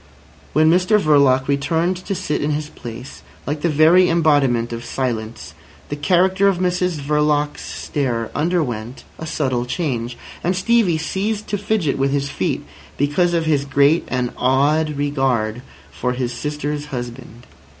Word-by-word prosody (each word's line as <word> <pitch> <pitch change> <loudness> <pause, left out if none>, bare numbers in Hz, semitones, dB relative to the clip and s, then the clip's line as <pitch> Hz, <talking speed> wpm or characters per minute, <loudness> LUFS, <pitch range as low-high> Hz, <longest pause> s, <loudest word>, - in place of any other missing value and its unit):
When 155 +2 +4
Mr 185 +6 +4
Verloc 140 -6 +3
returned 160 +6 +1
to 195 - -1
sit 150 -3 -2
in 150 - 0
his 150 0 -2
place, 120 -1 -9 0.2
like 145 +1 -3
the 170 - +1
very 165 +4 +5
embodiment 145 -8 +2
of 115 0 -5
silence, 115 - -4 0.4
the 145 - -2
character 185 +6 +3
of 195 -2 +2
Mrs 180 -2 0
Verloc's 150 0 0
stare 120 -6 -3
underwent 130 -8 -2 0.2
a 160 - -6
subtle 130 -6 -1
change, 125 -5 -3 0.3
and 180 +2 +1
Stevie 190 -3 +2
ceased 200 +6 -2
to 205 - 0
fidget 200 -9 0
with 135 0 +2
his 140 0 -1
feet, - - -2 0.3
because 170 +5 +1
of 165 -1 0
his 150 -3 +2
great 140 +3 +3
and 125 -1 -1
awed 145 +4 +2
regard 130 -6 0 0.3
for 125 0 -2
his 125 -1 -2
sister's 150 +3 -3
husband. 120 -3 -7
145 Hz, 150 wpm, -20 LUFS, 130-170 Hz, 0.4 s, very